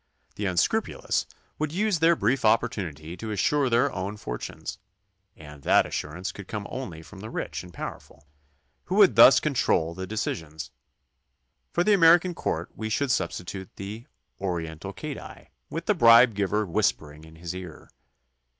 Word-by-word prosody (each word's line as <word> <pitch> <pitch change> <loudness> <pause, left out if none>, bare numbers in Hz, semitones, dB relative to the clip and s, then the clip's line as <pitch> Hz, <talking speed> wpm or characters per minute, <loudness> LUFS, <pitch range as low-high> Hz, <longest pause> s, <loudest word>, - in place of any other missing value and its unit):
The 105 - -2
unscrupulous 220 - 0 0.3
would 155 -1 -1
use 200 0 0
their 165 +2 +5
brief 125 +1 0
opportunity 95 -8 0
to 110 +5 -6
assure 130 +7 +1
their 120 +1 +3
own 100 +3 -4
for - - -5
tunes, - - -7 0.6
and 75 -1 -12
that - - +4
assurance 90 +5 -4
could 100 -2 -10
come 105 -2 -5
only 90 -12 -6
from 95 +3 -13
the 110 +3 -7
rich - - -4
and 90 - -12
the - - -19
powerful, 75 +1 -8 0.6
who - - -2
would - - +6
thus - - +9
control 80 +1 +1
the 95 +2 -6
de 110 - -6
cisions. 80 -6 -4 1.0
For 175 - +1
the 210 - +4
American 175 -1 +5
court - - -3
we 110 0 -4
should 135 +4 0
substitute 90 0 -3
the 105 +4 -8 0.3
oriental 85 -4 -4
cadi, - - -9 0.2
with 165 +2 -5
the 210 - +3
bribe 115 - +7
giver 105 +1 0
whispering 80 -6 -1
in 80 0 -14
his 85 +1 -6
ear. 90 -4 -9
100 Hz, 160 wpm, -26 LUFS, 85-125 Hz, 1.0 s, thus